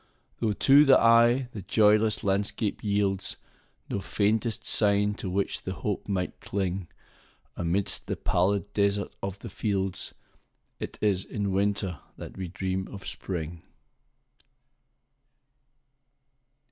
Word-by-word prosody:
Though, 110 -3 +1
to 140 +7 +6
the 135 -3 +6
eye, 120 +2 +5
the 105 - -7
joyless 105 +2 +3
landscape 100 +2 -1
yieldsNo 100 -1 -3
faintest 110 +3 0
sign 105 -1 +3
to 100 - -5
which 100 +2 -1
the 95 - -4
hope 105 0 -3
might 90 -2 -2
cling,—Amidst 95 -1 -4
the - - -1
pallid 100 +3 0
desert 100 0 +1
of 95 0 -4
the - - -9
fields,—It 95 -3 -5
is 100 -3 +2
in 100 -2 -3
Winter 100 -4 0 0.2
that - - -9
we 95 -1 -5
dream 95 +1 -3
of 100 -2 -10
Spring. 85 -2 -5
100 Hz, 110 wpm, -27 LUFS, 95-105 Hz, 0.2 s, to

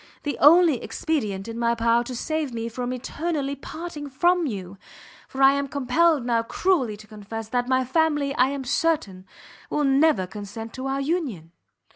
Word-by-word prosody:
the 290 -3 -2
only 320 -3 +6
expedient 215 -12 -2
in 230 0 -6
my 235 0 +2
power 230 +1 +2
to 250 +1 -6
save 310 +2 -2
me 230 -1 -4
from 245 +2 -4
eternally 280 +3 -3
parting 300 +1 -7
from 345 +5 +2
you! 195 -5 -6 0.5
for 270 0 -1
I 270 - +8
am 280 0 -1
compelled 285 +2 +2
now 235 -2 +2
cruelly 255 - 0
to 215 - -13
confess, 215 +1 -8
that 245 +1 -1
my 260 0 +2
family, 295 0 +1
I 255 -2 +3
am 275 0 -4
certain, 245 - -1 0.4
will 295 - 0
never 275 -6 +3
consent 210 +4 -8
to 260 0 -5
our 270 0 -1
union!" 270 - -2
260 Hz, 170 wpm, -24 LUFS, 230-300 Hz, 0.5 s, I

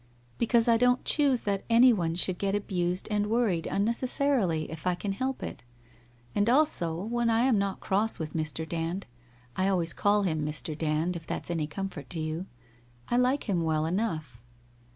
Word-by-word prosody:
'Because 235 0 +3
I 230 -1 +5
don't 250 +1 +2
choose 280 -5 +2
that 200 -1 -1
anyone 230 -9 +4
should 180 0 +2
get 200 0 0
abused 180 -3 -2
and 210 0 +1
worried 215 -8 +1
unnecessarily, 230 - 0
it' 160 +2 -6
I 180 - +2
can 200 +3 -3
help 260 +6 -3
it. - - -6 0.7
And 205 +2 +2
also 240 - +2
when 235 +2 0
I 225 0 +3
am 245 -4 +3
not 195 -1 -2
crosfl 210 +3 0
with 155 -3 -5
.Mr. 160 0 -3
Dand 170 +4 -3 0.3
— 120 0 -30
I 190 - +1
always 175 -4 +2
call 205 0 +2
him 155 -5 0
Mr. 150 +1 -3
Dand 160 +3 -1
if 165 -1 -8
that's - - -3
any 160 -3 -1
comfort 175 -4 -6
to 175 - -5
you 155 +4 -3 0.3
— 120 0 -28
1 245 +1 +3
like 260 +3 +1
him 185 -5 +1
well 160 -1 0
enough. 160 - -2
190 Hz, 185 wpm, -28 LUFS, 160-230 Hz, 0.7 s, I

